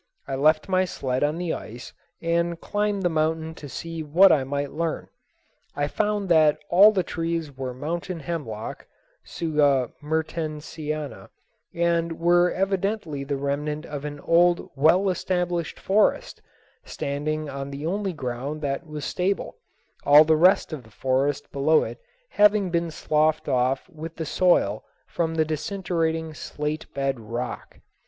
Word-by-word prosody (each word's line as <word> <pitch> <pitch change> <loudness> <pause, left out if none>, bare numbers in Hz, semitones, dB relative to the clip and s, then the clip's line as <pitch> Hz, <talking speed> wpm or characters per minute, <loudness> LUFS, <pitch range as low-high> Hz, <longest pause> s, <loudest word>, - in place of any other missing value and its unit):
I 135 - -4
left 150 +7 +3
my 185 -1 +2
sled 130 -7 -2
on 150 +2 +1
the 175 -2 -2
ice 120 +3 -8 0.3
and 170 0 0
climbed 205 -1 -1
the - - +3
mountain 160 0 -1
to 145 -3 -10
see 165 +3 -6
what 170 +6 +6
I 140 - +3
might 140 +1 -3
learn. 165 0 -3 0.7
I 145 0 0
found 210 +4 -1
that 155 -3 +5
all 200 +5 +8
the 190 -4 0
trees 165 -4 -3
were 130 -1 -4
mountain 165 +6 -4
hemlock 135 -9 -5 0.4
(Tsuga 145 -6 +1
mertensiana), 155 -1 -4 0.5
and 170 -1 0
were 175 +1 +4
evidently 195 -6 -1
the 140 0 -2
remnant 150 +2 -2
of 145 -1 -6
an 145 -1 -6
old 175 +1 +3
well 160 +8 +4
established 180 -2 -1
forest, 205 +2 +1 0.4
standing 150 +2 -3
on 135 0 -5
the 140 +2 -6
only 195 +2 -1
ground 140 +2 -4
that 140 +4 -2
was 150 -2 -6
stable, 190 +2 -2 0.5
all 145 +2 +8
the 160 0 +3
rest 180 +2 +4
of 150 - -5
the 110 - -18
forest 135 +5 -1
below 150 +3 +3
it - - -7 0.3
having 205 -3 +4
been 170 -1 0
sloughed 155 0 +1
off 130 +1 +1
with 165 -2 -9
the 160 - -4
soil 150 - +2 0.2
from 165 -1 -2
the 160 -1 +2
disintegrating 160 0 -2
slate 150 +1 -5
bed 135 -2 -1
rock. 120 +3 -6
155 Hz, 145 wpm, -25 LUFS, 145-175 Hz, 0.7 s, all